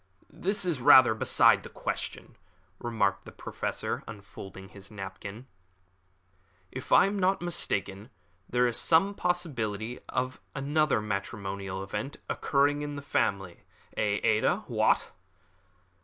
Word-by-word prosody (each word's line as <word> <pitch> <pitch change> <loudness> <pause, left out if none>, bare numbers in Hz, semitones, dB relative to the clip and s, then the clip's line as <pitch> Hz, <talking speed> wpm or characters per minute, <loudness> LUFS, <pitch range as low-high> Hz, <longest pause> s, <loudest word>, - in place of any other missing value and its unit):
"This 200 +1 -1
is 165 -8 -1
rather 130 -3 +8
beside 110 - +4
the - - -10
question," - - -4 0.4
remarked 100 -5 0
the - - -10
Professor, - - -4 0.2
folding 95 -1 -10
up 95 - -16
his 100 -1 -9
napkin. 100 +3 -8 1.3
"If 130 +1 -8
I - - +7
am 200 +1 -1
not 190 +1 +2
mistaken, 105 - -2 0.4
there 125 0 +3
is 120 -1 0
some 180 +5 +3
possibility 125 - -2
of 130 0 -2
another 145 -2 +1
matrimonial 100 -2 -4
event 135 +8 -5
occurring 145 +1 +1
in 145 0 -4
the 140 - -7
family. 95 -9 -1 0.4
Eh, 105 -1 +1
Ada? 110 0 +2
What!" - - +2
120 Hz, 125 wpm, -29 LUFS, 100-145 Hz, 1.3 s, rather